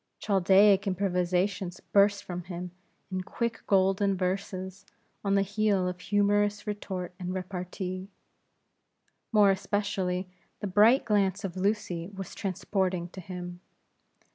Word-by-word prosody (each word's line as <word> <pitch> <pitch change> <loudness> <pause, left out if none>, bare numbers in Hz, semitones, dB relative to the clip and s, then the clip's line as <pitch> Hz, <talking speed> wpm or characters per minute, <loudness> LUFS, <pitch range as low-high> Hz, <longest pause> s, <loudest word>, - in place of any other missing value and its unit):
Chaldaic 195 0 +4
improvisations 185 0 0
burst 200 0 +3
from 180 -1 -6
him, 180 0 -6 0.4
in 185 0 -1
quick 235 +5 -3
Golden 195 0 +3
Verses, 190 0 -3 0.4
on 200 -1 +2
the 195 - +4
heel 200 -2 +1
of 180 0 -4
humorous 205 +1 +1
retort 190 -4 -4
and 180 0 -4
repartee. 185 0 -5 1.2
More 210 -3 +6
especially, 190 -2 -1 0.3
the - - -4
bright 210 +7 +5
glance 200 -2 +1
of 190 -2 -4
Lucy 185 -3 -1
was 195 -1 -7
transporting 185 -2 -1
to 185 - -9
him. 180 0 -7
190 Hz, 115 wpm, -29 LUFS, 180-205 Hz, 1.2 s, More